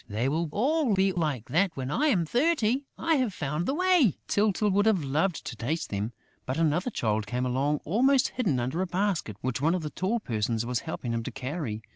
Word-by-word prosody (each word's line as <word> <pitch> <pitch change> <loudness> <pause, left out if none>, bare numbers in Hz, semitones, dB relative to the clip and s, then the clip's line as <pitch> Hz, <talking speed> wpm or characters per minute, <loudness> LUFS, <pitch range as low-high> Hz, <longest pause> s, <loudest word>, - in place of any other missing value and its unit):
"They 110 +5 -1
will 160 +3 0
all 265 - +2
be 190 0 +3
like 150 -10 -2
that 170 +4 +1
when 130 +1 -3
I 300 - +2
am 185 - +2
thirty: 260 - +1
I 325 -1 +2
have 245 -8 0
found 150 +3 -2
the 270 - 0
way...." 360 - +3
Tyltyl 210 0 +2
would 205 +3 +3
have 195 -8 +3
loved 155 +6 0
to 120 - -5
taste 140 +9 -3
them, 105 +3 -2 0.4
but 130 - -2
another 165 +6 +1
Child 110 - -1
came 125 +3 -1
along 140 +4 0
almost 260 - +3
hidden 190 - 0
under 130 +9 -1
a 190 - -1
basket 180 - -1
which 130 0 -2
one 165 +4 +3
of 180 - -3
the 150 - -4
tall 205 +6 -1
persons 115 - -1
was 125 -1 -1
helping 120 -2 -3
him 115 - -1
to - - -5
carry. 130 -5 -4
165 Hz, 215 wpm, -28 LUFS, 130-210 Hz, 0.4 s, be